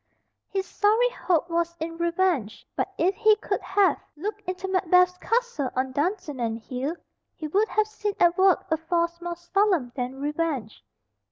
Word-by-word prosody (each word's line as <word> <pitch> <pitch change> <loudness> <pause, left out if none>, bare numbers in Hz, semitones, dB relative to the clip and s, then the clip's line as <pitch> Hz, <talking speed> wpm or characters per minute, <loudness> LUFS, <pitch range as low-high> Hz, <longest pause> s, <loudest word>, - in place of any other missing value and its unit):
His 385 -1 -2
sorry 440 +6 +3
hope 350 -8 0
was 340 0 -1
in 330 +1 -4
revenge, 340 - 0
but - - -1
if 360 +4 +2
he 435 +1 +4
could 425 - -3
have 395 0 +2 0.2
looked 410 +7 -4
into 370 +1 -3
Macbeth's 360 -1 +3
castle 470 - 0
on 260 +1 0
Dunsinane 285 - -1
Hill, 255 +7 -4 0.4
he 310 - -5
would 405 +8 +2
have 430 -1 +2
seen 425 -2 -4
at 345 0 +5
work 380 0 +4
a 320 - +3
force 340 +1 -1
more 345 0 -4
solemn 345 - +1
than 255 +1 -4
revenge. 290 - -2
345 Hz, 160 wpm, -26 LUFS, 300-390 Hz, 0.4 s, at